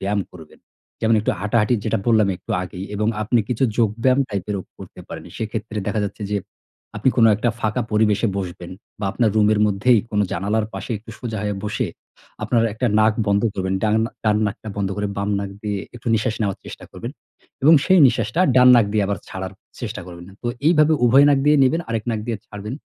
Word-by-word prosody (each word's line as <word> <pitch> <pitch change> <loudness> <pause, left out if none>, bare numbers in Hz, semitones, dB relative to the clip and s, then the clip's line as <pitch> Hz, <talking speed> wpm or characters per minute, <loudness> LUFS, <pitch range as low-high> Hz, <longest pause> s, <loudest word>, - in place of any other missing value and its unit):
ব্যায়াম 100 +1 0
করবেন। 80 -4 -14 0.4
যেমন, 115 0 +3
একটু 105 - 0
হাঁটাহাঁটি, 105 +3 +2
যেটা 115 - 0
বললাম 110 -3 +4
একটু 90 - -13
আগেই। 90 +1 -7
এবং 105 +1 0
আপনি 115 +3 +1
কিছু 125 +1 +1
যোগব্যায়াম 115 +4 +2
টাইপেরও 100 -1 -3 0.2
করতে - - -11
পারেন। - - -8
সেক্ষেত্রে 110 0 -4
দেখা 110 +1 -1
যাচ্ছে 100 +2 -6
যে, 105 - +2 0.6
আপনি 105 +5 +1
কোনো 115 -2 +6
একটা 115 +2 0
ফাঁকা 110 +3 0
পরিবেশে 105 0 +2
বসবেন 90 -2 -6 0.3
বা - - -2
আপনার 115 -3 +2
রুমের 105 0 +3
মধ্যেই 105 +4 +3
কোনো 105 -1 +1
জানালার 105 +5 -1
পাশে 95 +5 -6
একটু 115 +2 -13
সোজা 115 -3 -4
হয়ে 105 -1 -2
বসে 105 - -1 0.6
আপনার 115 -2 +2
একটা 125 +3 -1
নাক 110 0 +4
বন্ধ 100 0 +2
করবেন। 95 0 -2
ডান 105 -1 +2 0.3
ডান 105 -1 +3
নাকটা 105 +1 -6
বন্ধ 100 -2 -1
করে 105 0 -2
বাম 100 +1 -1
নাক 100 -1 -4
দিয়ে 105 -1 -2 0.2
একটু 120 - -16
নিঃশ্বাস 110 +1 0
নেওয়ার 100 -3 -1
চেষ্টা - - -10
করবেন - - -7 0.5
এবং 160 +4 +7
সেই 185 - +5
নিঃশ্বাসটা 120 - 0 0.2
ডান 125 0 +7
নাক 115 -4 +4
দিয়ে 105 -2 +2
আবার 100 -1 -2
ছাড়ার 95 0 -6 0.3
চেষ্টা - - -5
করবেন। 85 -1 -10 0.2
তো - - -4 0.2
এইভাবে 155 -1 +5
উভয় 135 +4 +6
নাক 140 -1 +4
দিয়ে 150 0 +5
নেবেন, 160 +6 +2
আরেক 115 -2 -2
নাক 110 -2 -2
দিয়ে 115 -2 -2
ছাড়বেন। 105 +3 -7
105 Hz, 195 wpm, -21 LUFS, 100-115 Hz, 0.6 s, এবং